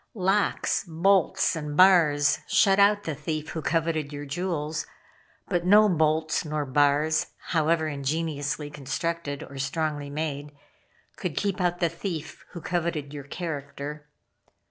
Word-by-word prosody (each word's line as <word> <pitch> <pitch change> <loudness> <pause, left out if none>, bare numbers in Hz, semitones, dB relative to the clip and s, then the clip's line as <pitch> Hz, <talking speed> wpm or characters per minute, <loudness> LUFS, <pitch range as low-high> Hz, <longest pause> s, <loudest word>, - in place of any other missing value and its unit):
Locks, 195 +1 +1
bolts 190 +2 +2
and 150 -2 -5
bars 165 -6 +5
shut 195 0 +4
out 205 +1 +4
the 160 - -3
thief 155 +1 -4
who 160 - -4
coveted 160 -2 -1
your 145 0 -6
jewels; 155 -1 -3 0.6
but 175 -1 0
no 210 +4 +6
bolts 160 -3 +1
nor 150 -2 -2
bars, 145 +3 +2 0.3
however 160 0 +2
ingeniously 145 0 -2
constructed 150 +1 -3
or 140 0 -10
strongly 145 +1 -2
made, 145 -1 -4 0.6
could 170 -6 -4
keep 200 -2 -1
out 175 0 0
the 170 - +4
thief 165 -2 -6
who 170 - -7
coveted 165 -5 -2
your 145 -2 -7
character. 150 -2 -6
155 Hz, 130 wpm, -26 LUFS, 145-175 Hz, 0.6 s, no